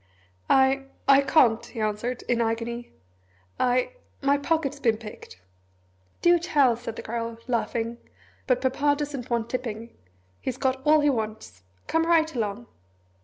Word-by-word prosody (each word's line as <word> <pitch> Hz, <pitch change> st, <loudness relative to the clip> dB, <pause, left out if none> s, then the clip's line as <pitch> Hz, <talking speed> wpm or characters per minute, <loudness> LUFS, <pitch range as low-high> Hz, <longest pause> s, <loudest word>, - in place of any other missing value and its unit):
"I 270 Hz, 0 st, +4 dB, 0.2 s
I 275 Hz, 0 st, +7 dB
can't," 260 Hz, -5 st, +4 dB
he 235 Hz, 0 st, -9 dB
answered, 215 Hz, +3 st, -2 dB
in 240 Hz, -1 st, +1 dB
an 230 Hz, -, +2 dB
agony. 235 Hz, +1 st, -4 dB, 0.7 s
"I 250 Hz, -, +2 dB, 0.3 s
my 280 Hz, 0 st, +3 dB
pocket's 295 Hz, -2 st, -1 dB
been 230 Hz, -5 st, +2 dB
picked 210 Hz, -, -11 dB, 0.4 s
" 90 Hz, 0 st, -38 dB
"Do 345 Hz, 0 st, +6 dB
tell!" 285 Hz, -7 st, +3 dB
said 230 Hz, -1 st, -7 dB
the -, -, -7 dB
Girl, 230 Hz, 0 st, -4 dB
laughing; 235 Hz, -1 st, -2 dB, 0.5 s
"but 255 Hz, -2 st, +2 dB
Papa 280 Hz, +3 st, +2 dB
doesn't 280 Hz, -4 st, -5 dB
want 235 Hz, -1 st, -1 dB
tipping 230 Hz, -2 st, -5 dB, 0.4 s
he's 255 Hz, -1 st, -4 dB
got 265 Hz, -1 st, 0 dB
all 305 Hz, 0 st, +6 dB
he 290 Hz, -1 st, +4 dB
wants 215 Hz, -, -5 dB, 0.2 s
come 325 Hz, 0 st, +1 dB
right 320 Hz, -2 st, +3 dB
along." 205 Hz, -, -3 dB
245 Hz, 150 wpm, -26 LUFS, 225-275 Hz, 0.7 s, I